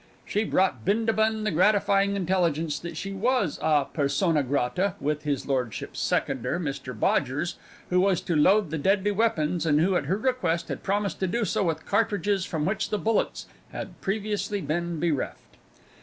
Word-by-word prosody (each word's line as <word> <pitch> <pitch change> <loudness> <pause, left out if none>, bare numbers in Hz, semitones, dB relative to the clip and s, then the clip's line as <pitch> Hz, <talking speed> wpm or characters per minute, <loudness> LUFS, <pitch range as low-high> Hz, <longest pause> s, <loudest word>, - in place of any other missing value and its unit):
She 210 - 0
brought 185 - +1
Bindabun 220 - +1
the 215 - 0
gratifying 200 +2 +3
intelligence 165 -5 0
that 170 0 -7
she 195 +4 -4
was 215 - 0
a 150 -3 +3
persona 150 +3 +1
grata 145 +8 0
with 150 +1 -1
his 140 -3 -1
lordship's 125 -5 -3
seconder, - - 0
Mr 135 -7 -5
Bodgers, 145 +11 0 0.3
who 180 0 +4
was 190 -2 +3
to 170 - -2
load 185 +3 +4
the 160 - -2
deadly 195 +5 +2
weapons, 190 -6 +1
and 150 -2 +3
who, 185 +4 +2
at 145 - 0
her 185 +7 0
request, 190 -9 0
had - - -4
promised 200 +1 -1
to 190 - 0
do 225 +4 0
so 210 -1 0
with 165 -2 -2
cartridges 205 -2 +1
from 155 -3 -2
which 195 +3 -1
the 210 - 0
bullets 220 +2 0 0.3
had - - -7
previously 205 0 -2
been 170 -1 -2
bereft. 160 -5 -3
185 Hz, 170 wpm, -26 LUFS, 155-205 Hz, 0.3 s, who